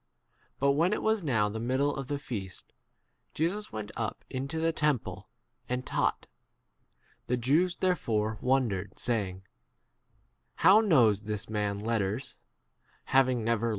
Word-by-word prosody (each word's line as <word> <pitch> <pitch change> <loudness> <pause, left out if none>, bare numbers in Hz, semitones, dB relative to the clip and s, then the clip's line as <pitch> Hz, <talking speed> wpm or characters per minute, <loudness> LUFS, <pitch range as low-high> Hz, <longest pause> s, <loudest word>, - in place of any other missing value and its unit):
* - - -39
But 140 +1 +4
when 165 +8 +2
it - - -2
was 220 -1 +2
now 115 -10 +1
the 110 +2 -4
middle 130 +5 0
of 135 -1 -5
the 145 - -2
feast, 100 -9 -7 0.6
Jesus 185 +7 -1
went 110 -1 -5
up 110 -2 -4
into 135 +4 -3
5 160 - -1
the 165 - +3
temple 150 -7 -1 0.4
° - - -39
and 125 0 -2
taught, - - 0
p - - -20 1.0
The 125 +1 +1
Jews 155 +9 +2
therefore 110 - 0
wondered, 120 -7 0
saying, 95 -6 -2 1.1
How 200 +3 +6
knows 120 - +4
this 105 -1 -3
man 105 -1 -1
letters, 110 +3 -2 0.7
having 130 -4 +2
m 115 -2 +2
T.R. 115 +1 0
125 Hz, 150 wpm, -29 LUFS, 110-145 Hz, 1.1 s, How